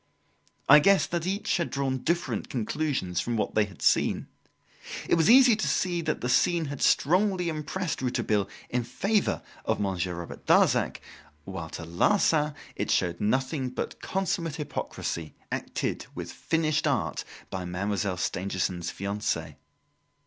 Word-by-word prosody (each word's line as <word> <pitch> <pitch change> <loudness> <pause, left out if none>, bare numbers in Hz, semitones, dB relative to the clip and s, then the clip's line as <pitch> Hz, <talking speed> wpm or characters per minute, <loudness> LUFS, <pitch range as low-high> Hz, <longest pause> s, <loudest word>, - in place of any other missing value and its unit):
I 150 +2 +10
guessed 195 +5 +4
that 170 0 -1
each 195 +2 0
had 170 - -1
drawn 135 -1 -1
different 170 +5 -1
conclusions 125 - -1
from 120 -1 -2
what 105 - -1
they 110 - +3
had 100 -4 -12
seen. - - +3 0.8
It - - +1
was 165 +1 +4
easy 250 -1 +8
to 215 - -1
see 175 -2 +1
that 155 -2 -2
the 125 - -1
scene 165 +6 +3
had 145 -1 -6
strongly 180 +2 +3
impressed 160 +2 -3
Rouletabille 120 -5 0 0.2
in 125 0 0
favour 195 - 0 0.2
of - - 0
Monsieur 95 -3 -1
Robert 85 0 -8
Darzac; - - +3 0.4
while, 85 -4 -6
to 80 - -7
Larsan, 150 - +2 0.2
it - - -3
showed 85 -1 +1
nothing 130 +5 0
but 125 - -5
consummate 170 -5 -1
hypocrisy, 85 - -4 0.2
acted - - -3
with - - -5
finished 155 -2 0
art 135 -5 0 0.3
by 95 -1 -3
Mademoiselle 95 +1 -2
Stangerson's 90 -1 -2
fiance. 100 +2 -3
135 Hz, 140 wpm, -27 LUFS, -, 0.8 s, I